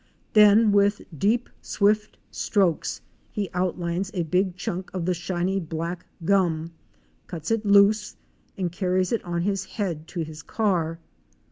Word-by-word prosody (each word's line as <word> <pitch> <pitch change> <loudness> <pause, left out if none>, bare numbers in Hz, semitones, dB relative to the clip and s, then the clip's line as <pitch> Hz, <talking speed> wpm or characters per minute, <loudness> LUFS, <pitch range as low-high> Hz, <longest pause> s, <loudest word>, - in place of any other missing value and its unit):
Then 210 +1 +7
with 200 0 +3
deep 220 - +1
swift 210 +1 +1
strokes 190 -7 0 0.3
he 205 -3 -3
outlines 180 +1 -1
a 175 - 0
big 180 +3 0
chunk 180 0 -4
of 175 -3 -2
the 180 - +2
shiny 180 +2 -1
black 170 +1 -5 0.2
gum, 170 -4 +2 0.6
cuts 170 +1 -5
it 225 -2 0
loose, 205 +1 +4 0.4
and 180 -3 -1
carries 185 0 0
it 230 - 0
on 170 -1 -2
his 195 0 0
head 170 -8 -4
to 175 - -4
his 155 -1 -6
car. 175 -7 0
185 Hz, 140 wpm, -25 LUFS, 170-205 Hz, 0.6 s, Then